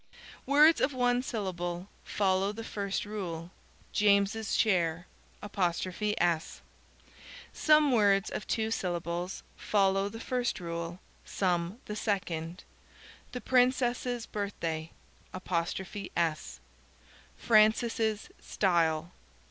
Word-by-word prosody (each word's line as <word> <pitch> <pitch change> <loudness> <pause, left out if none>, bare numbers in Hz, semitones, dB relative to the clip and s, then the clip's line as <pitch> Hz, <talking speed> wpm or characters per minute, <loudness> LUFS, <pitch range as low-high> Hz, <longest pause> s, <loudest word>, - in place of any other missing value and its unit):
Words 300 +4 +6
of 280 - +2
one 245 -1 +2
syllable 180 -7 -4 0.2
follow 195 0 +1
the 225 +2 -7
first 200 0 -3
rule: 180 -5 -5 0.4
"James's 205 +1 +2
share." 175 -5 +1 2.5
Some 305 -2 +4
words 205 -4 +3
of 210 - -5
two 220 -1 0
syllables 175 -1 -3
follow 195 -1 +1
the 225 +2 -8
first 245 0 -1
rule, 170 0 -5 0.2
some 180 +4 -1
the 210 - -5
second: 180 -5 -3 0.7
"the 250 - -5
princess's 250 -1 +1
birthday"; 165 -6 -4 2.5
"Francis' 220 0 +2
style." 165 -3 +1
200 Hz, 85 wpm, -30 LUFS, 175-225 Hz, 2.5 s, Words